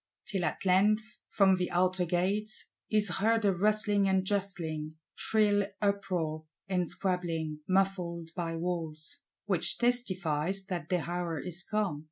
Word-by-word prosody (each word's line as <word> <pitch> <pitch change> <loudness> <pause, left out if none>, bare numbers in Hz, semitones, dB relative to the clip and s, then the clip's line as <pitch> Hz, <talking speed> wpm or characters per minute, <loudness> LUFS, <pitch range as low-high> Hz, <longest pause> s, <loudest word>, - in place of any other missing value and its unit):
Till 190 -3 -2
at - - -3
length, 210 +4 +2
from 190 -2 +4
the 180 -1 -1
outer 180 +1 +2
gates, 195 +5 -1 0.2
is 210 -4 +2
heard 225 0 +3
a 195 - +4
rustling 205 +1 +3
and 190 0 +2
justling, 170 -6 -2 0.2
shrill 205 -2 +2
uproar 185 -6 -1 0.2
and 180 -2 0
squabbling, 165 -5 -2
muffled 180 -3 0
by 165 -2 -2
walls; 165 -3 -4 0.3
which - - +1
testifies 190 -7 0
that 175 -5 -4
the 180 -3 0
hour 175 -2 -2
is 175 +4 -4
come! 205 -7 -1
185 Hz, 135 wpm, -30 LUFS, 170-205 Hz, 0.3 s, from